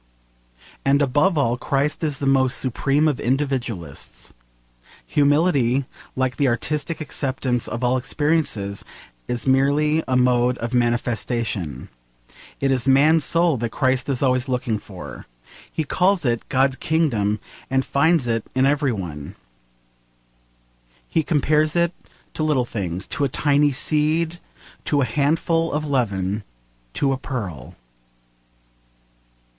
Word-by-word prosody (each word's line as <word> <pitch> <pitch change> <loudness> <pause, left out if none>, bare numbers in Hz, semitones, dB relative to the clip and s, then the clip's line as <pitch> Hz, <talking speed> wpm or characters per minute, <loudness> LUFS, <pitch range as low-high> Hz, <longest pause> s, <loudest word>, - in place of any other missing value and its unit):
And 140 +1 +3
above 145 +6 +2
all, 125 -4 +1
Christ 145 +5 -1
is 150 -3 -1
the 140 - -4
most 135 -1 +3
supreme 140 +4 +1
of 145 -5 0
individualists. 120 - -3 0.7
Humility, 140 -3 +2 0.3
like 130 -1 -1
the 140 - +2
artistic, 150 +6 -2
acceptance 130 -4 -1
of 120 +2 -4
all 125 +1 +2
experiences, 130 -8 -1 0.4
is 120 -1 -2
merely 145 +4 +2
a 130 -1 +2
mode 125 0 +3
of 115 +1 -4
manifestation. 115 - -1 0.7
It 135 -1 +1
is 130 -1 0
man's 150 +4 +5
soul 170 -2 +2
that 120 0 -2
Christ 130 +2 0
is 135 -1 -1
always 130 0 +1
looking 125 -4 -1
for. 95 -4 -10 0.4
He 160 - -2
calls 180 +3 +1
it 120 -2 -1
'God's 135 0 +2
Kingdom,' 115 -11 0 0.3
and 130 0 +1
finds 160 0 +2
it 115 -2 0
in 130 0 +3
every 140 -1 +2
one. 80 -9 -6 1.7
He 160 - +1
compares 155 0 +1
it 170 0 +2 0.4
to - - -5
little 150 -5 +2
things, 95 -5 -3
to - - -2
a 140 - +2
tiny 145 +2 +2
seed, 155 +4 0 0.5
to 145 -2 +2
a - - +2
handful 160 +6 +1
of 150 +1 -2
leaven, 105 -7 -1 0.5
to 140 - +1
a - - -2
pearl. 100 - -6
135 Hz, 130 wpm, -22 LUFS, 120-150 Hz, 1.7 s, man's